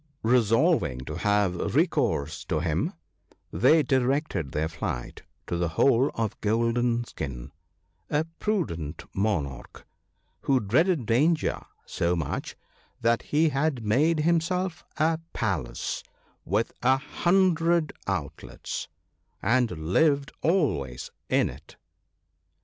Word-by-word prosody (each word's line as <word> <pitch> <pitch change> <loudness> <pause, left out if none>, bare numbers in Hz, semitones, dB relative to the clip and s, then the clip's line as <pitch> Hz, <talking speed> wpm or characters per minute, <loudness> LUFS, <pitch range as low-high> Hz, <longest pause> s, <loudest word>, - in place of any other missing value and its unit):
Resolving 115 - +3
to 65 - -6
have 105 -4 0
recourse 70 +3 +1
to 80 -4 -1
him, 80 -1 -1 0.6
they 160 -1 +5
directed 130 - 0
their 80 +1 -1
flight 80 - -5 0.2
to 85 - -2
the 85 -1 0
hole 135 0 +4
of 110 -3 -3
Golden 115 +2 +1
skin 70 - -7 0.3
— - - -50 0.3
a 150 +1 +1 0.2
prudent 85 - -2
monarch, 90 - -2 0.5
who 135 -2 +2
dreaded 140 - +2
danger 150 +9 +2 0.2
so 85 +1 0
much 80 -5 -3 0.5
that 115 0 +2
he 155 +2 +2
had 140 -4 -1
made 150 +9 +3
himself 170 +2 0
a 160 +1 +2
palace 65 - -2 0.4
with 105 +6 0
a 130 +2 +4
hundred 170 +1 +2
outlets, 90 -8 -4 0.5
and 125 +1 +2
lived 135 - +1
always 115 - 0 0.2
in - - +3
it. - - -11
115 Hz, 110 wpm, -27 LUFS, -, 0.6 s, they